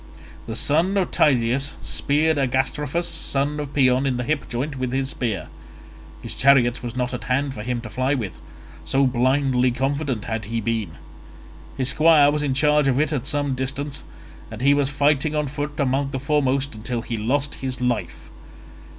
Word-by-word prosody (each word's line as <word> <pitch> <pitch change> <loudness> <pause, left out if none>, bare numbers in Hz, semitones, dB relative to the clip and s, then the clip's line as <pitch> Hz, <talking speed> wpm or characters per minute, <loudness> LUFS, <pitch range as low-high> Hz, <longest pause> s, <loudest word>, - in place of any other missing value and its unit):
The 115 - -4
son 165 - +2
of 190 - 0
Tydeus 130 0 +2
speared 150 +1 +1
Agastrophus 140 +5 0
son 150 -3 -1
of 145 -2 -5
Paeon 130 -1 +3
in 130 -2 0
the 125 - -2
hip 150 +3 -2
joint 135 +3 -3
with 130 -1 -2
his 135 0 -1
spear. 105 - -3 0.8
His - - -6
chariot 130 -3 +4
was 120 -1 -6
not 125 0 -2
at 125 - -5
hand 135 +2 0
for 105 - -7
him 120 +1 -3
to 120 - -8
fly 130 +5 0
with, 105 -9 -5 0.4
so 135 +1 +2
blindly 130 0 +2
confident 135 -1 -2
had 110 -2 -3
he 115 +2 -2
been. 110 -6 -2 0.8
His 130 -1 +2
squire 155 -2 +5
was 150 0 -1
in 140 -3 -1
charge 150 0 +3
of 135 0 +2
it 155 0 +1
at 135 -2 -2
some 145 -2 0
distance 135 +2 -3 0.5
and 110 +1 -8
he 140 +2 +5
was 145 -1 +1
fighting 145 +1 +1
on 150 0 0
foot 145 +2 -5
among 135 0 +1
the 135 - -4
foremost 140 -1 0
until 115 +2 -4
he 120 - -4
lost 135 +7 -1
his 130 -1 -3
life. 120 -8 -3
135 Hz, 180 wpm, -22 LUFS, 125-145 Hz, 0.8 s, squire